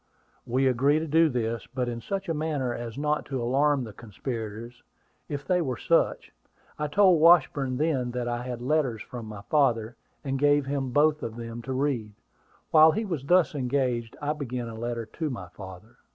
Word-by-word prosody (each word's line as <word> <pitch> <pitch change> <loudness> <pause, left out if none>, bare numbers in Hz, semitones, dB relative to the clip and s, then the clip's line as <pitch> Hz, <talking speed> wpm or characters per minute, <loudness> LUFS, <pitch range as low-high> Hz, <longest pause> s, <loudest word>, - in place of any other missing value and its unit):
We 130 +3 +1
agreed 135 +4 +3
to 160 - -4
do 160 +2 +4
this, 115 -3 -2
but 125 -2 0
in 120 -1 -4
such 195 - -4
a 165 - 0
manner 150 -5 -1
as 120 -1 -6
not 150 +1 0
to 135 -2 -3
alarm 135 +3 +2
the 110 -3 -8
conspirators, 115 +1 -7 0.5
if 145 -1 -4
they 180 -1 +2
were 130 -7 -2
such. - - +1 0.5
I 150 - 0
told 180 0 +4
Washburn 145 -6 +4
then 140 -5 0
that 120 0 -3
I 120 0 -2
had 125 -1 -5
letters 130 -5 0
from 120 -3 -8
my 105 -1 -8
father, 120 -4 +1 0.3
and 135 -2 -2
gave 145 0 +3
him 135 -1 -2
both 150 +3 +3
of 115 -4 -5
them 115 0 -7
to 130 +2 -5
read. 130 -6 -1 0.6
While 160 0 +8
he 220 +1 -1
was 165 -9 -4
thus 180 +2 +4
engaged, 125 -4 -1
I 145 +1 -1
began 125 -5 -4
a - - -8
letter 115 0 -4
to 155 +8 -4
my 100 -9 -6
father. 95 +3 -12
130 Hz, 190 wpm, -27 LUFS, 120-150 Hz, 0.6 s, While